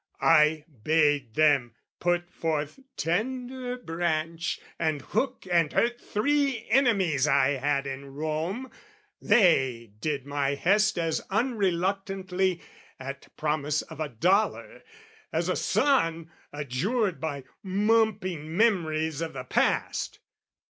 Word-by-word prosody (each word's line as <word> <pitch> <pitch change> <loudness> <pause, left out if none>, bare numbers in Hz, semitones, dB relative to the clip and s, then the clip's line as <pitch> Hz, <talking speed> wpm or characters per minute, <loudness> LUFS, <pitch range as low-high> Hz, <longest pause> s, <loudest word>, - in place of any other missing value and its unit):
I 155 -1 +5 0.2
bade 145 -4 +2
them 140 -7 +3 0.2
put 175 0 0
forth 155 - -2 0.2
tender 250 +7 -2
branch, 165 -4 -2 0.2
and 155 -3 0
hook 225 +2 -2
And 170 -3 +3
hurt 240 +1 +1
three 275 0 0
enemies 195 - +3
I 140 -2 +4
had 140 0 0
in 135 0 -7
Rome: 160 - -3 0.5
They 135 - +3
did 145 0 -2
my 140 -1 -1
hest 210 +7 +2
as 165 -2 0
unreluctantly, 195 -4 0 0.4
At 135 +1 -7
promise 150 -1 0
of - - -12
a 155 -2 -2
dollar, 185 - 0 0.5
as - - -1
a - - +1
son 165 - +1 0.2
Adjured 160 - -1
by 145 -4 -3 0.2
mumping 190 -5 0
memories 160 -8 +1
of 165 - -3
the 130 -1 -5
past! 125 - 0
165 Hz, 110 wpm, -27 LUFS, 145-205 Hz, 0.5 s, I